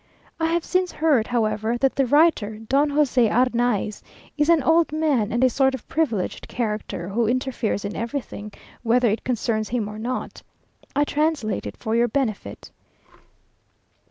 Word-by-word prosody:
I 325 Hz, -, +1 dB
have 335 Hz, 0 st, 0 dB
since 365 Hz, -1 st, 0 dB
heard, 295 Hz, -8 st, +2 dB
however, 220 Hz, -1 st, 0 dB
that 270 Hz, +2 st, +1 dB
the 270 Hz, -2 st, +1 dB
writer, 290 Hz, -7 st, +3 dB
Don 275 Hz, +7 st, +1 dB
José 270 Hz, -5 st, +3 dB
Arnaiz, 240 Hz, -3 st, +1 dB, 0.3 s
is 300 Hz, +1 st, +1 dB
an 330 Hz, -4 st, +4 dB
old 325 Hz, +2 st, +3 dB
man, 295 Hz, -9 st, +1 dB
and 240 Hz, +2 st, +1 dB
a -, -, +7 dB
sort 265 Hz, 0 st, +2 dB
of 260 Hz, -, -11 dB
privileged 235 Hz, -, -1 dB
character, 210 Hz, -6 st, -3 dB
who 225 Hz, +3 st, 0 dB
interferes 245 Hz, -4 st, -1 dB
in 200 Hz, -, -4 dB
everything, 230 Hz, -3 st, -5 dB, 0.3 s
whether 240 Hz, 0 st, +3 dB
it 215 Hz, -, -2 dB
concerns 220 Hz, -3 st, -1 dB
him 230 Hz, -3 st, -1 dB
or 210 Hz, +1 st, -7 dB
not. 250 Hz, +3 st, -4 dB, 0.5 s
I 290 Hz, -, +3 dB
translate 295 Hz, -8 st, -1 dB
it -, -, -8 dB
for 225 Hz, -1 st, -2 dB
your 235 Hz, +1 st, +3 dB
benefit. 235 Hz, -4 st, -3 dB
245 Hz, 155 wpm, -23 LUFS, 220-290 Hz, 0.5 s, a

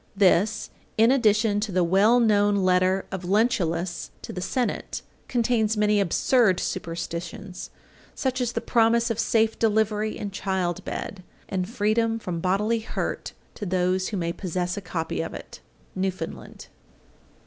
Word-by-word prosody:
This, 200 Hz, +2 st, +3 dB, 0.3 s
in 225 Hz, +3 st, +6 dB
addition 215 Hz, -4 st, +3 dB
to 210 Hz, 0 st, -2 dB
the 180 Hz, -1 st, +2 dB
well 200 Hz, +8 st, +4 dB
known 205 Hz, -3 st, +3 dB
letter 185 Hz, 0 st, +2 dB
of 190 Hz, -1 st, -4 dB
Lentulus 180 Hz, -4 st, 0 dB
to -, -, -6 dB
the 180 Hz, -, -4 dB
Senate, 245 Hz, +7 st, -2 dB, 0.2 s
contains 225 Hz, -3 st, +1 dB
many 210 Hz, 0 st, +3 dB
absurd 195 Hz, +2 st, +3 dB
superstitions, 170 Hz, +1 st, -5 dB, 0.5 s
such 260 Hz, -1 st, -1 dB
as 240 Hz, -1 st, -1 dB
the -, -, -2 dB
promise 235 Hz, 0 st, +3 dB
of 225 Hz, -, -3 dB
safe 225 Hz, -1 st, +2 dB
delivery 215 Hz, -1 st, +1 dB
in 205 Hz, -, -5 dB
child 190 Hz, -2 st, -2 dB
bed, 195 Hz, -, -5 dB, 0.3 s
and 185 Hz, -1 st, -2 dB
freedom 225 Hz, 0 st, +1 dB
from 180 Hz, -6 st, -4 dB
bodily 205 Hz, +6 st, +1 dB
hurt 220 Hz, -, -4 dB, 0.2 s
to -, -, -9 dB
those 185 Hz, 0 st, +1 dB
who 210 Hz, -, -3 dB
may 170 Hz, -1 st, -1 dB
possess 180 Hz, 0 st, -2 dB
a 205 Hz, -, -5 dB
copy 165 Hz, -3 st, -3 dB
of -, -, -5 dB
it. -, -, -10 dB, 0.4 s
_Newfoundland. 185 Hz, -3 st, -4 dB
205 Hz, 145 wpm, -25 LUFS, 180-225 Hz, 0.5 s, in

